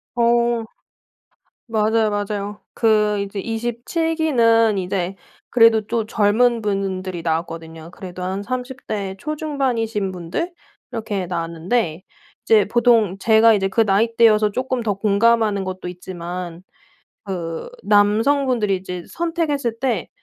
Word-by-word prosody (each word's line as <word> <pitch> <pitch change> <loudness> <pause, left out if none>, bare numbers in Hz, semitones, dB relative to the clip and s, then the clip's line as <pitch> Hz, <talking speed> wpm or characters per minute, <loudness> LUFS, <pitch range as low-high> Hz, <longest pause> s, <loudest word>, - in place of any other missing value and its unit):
어. 235 -1 +2 1.0
맞아요, 220 0 +2
맞아요. 205 0 -3
그 210 -2 +2
이제 200 0 -5
27 240 - -2
기는 230 -8 +3
이제 185 0 -2 0.3
그래도 230 -2 +5
또 230 0 -1
젊은 230 +3 +2
분들이 190 -4 -3
나왔거든요. 165 0 -4
그래도 180 -1 -8
한 190 +2 -3
30 255 +3 -5
대 200 -3 -3
초중반이신 255 -10 -2
분들 180 - -4 0.4
이렇게 215 -6 -3
나왔는데 170 +2 -2 0.4
이제 215 -2 +4
보통 230 -5 +3
제가 225 +2 +5
이제 195 -2 +1
그 210 - 0
나이대여서 215 +1 +3
쪼끔 255 +1 -2
더 210 -3 0
공감하는 210 0 +2
것도 185 -1 -5
있지만 175 -1 -7 0.6
그 170 -4 -4 0.2
남성분들이 215 +2 +3
이제 180 -1 -7
선택했을 305 -9 -2
때 240 -8 -1
215 Hz, 255 characters per minute, -21 LUFS, 190-235 Hz, 1.0 s, 그래도